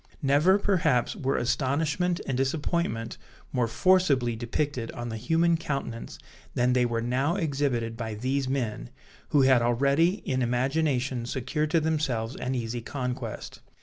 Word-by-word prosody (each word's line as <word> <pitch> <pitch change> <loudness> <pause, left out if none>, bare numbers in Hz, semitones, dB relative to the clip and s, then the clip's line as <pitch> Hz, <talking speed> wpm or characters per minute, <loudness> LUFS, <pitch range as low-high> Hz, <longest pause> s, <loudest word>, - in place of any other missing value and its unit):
Never, 150 +8 +4
perhaps, 170 -12 +1
were 135 0 -1
astonishment 155 +8 0
and 135 - -2
disappointment 135 -3 -1 0.3
more 125 -2 +1
forcibly 140 -4 +3
depicted 120 +1 -2
on 120 0 -5
the 110 - -4
human 165 +8 +2
countenance, 135 -7 -4 0.4
than 125 +1 +2
they 125 -1 +3
were 115 -1 -2
now 130 +7 0
exhibited 135 - -1
by 110 -2 -4
these 130 +4 -1
men, 115 - -2 0.4
who 145 -2 +4
had 130 -2 +5
already 140 +9 +3
in 130 -1 0
imagination 130 0 0
secured 150 +5 -2
to 165 +1 +3
themselves 140 -7 -1
an 130 +1 -3
easy 120 0 -3
conquest. 125 -3 -5
130 Hz, 140 wpm, -27 LUFS, 120-150 Hz, 0.4 s, had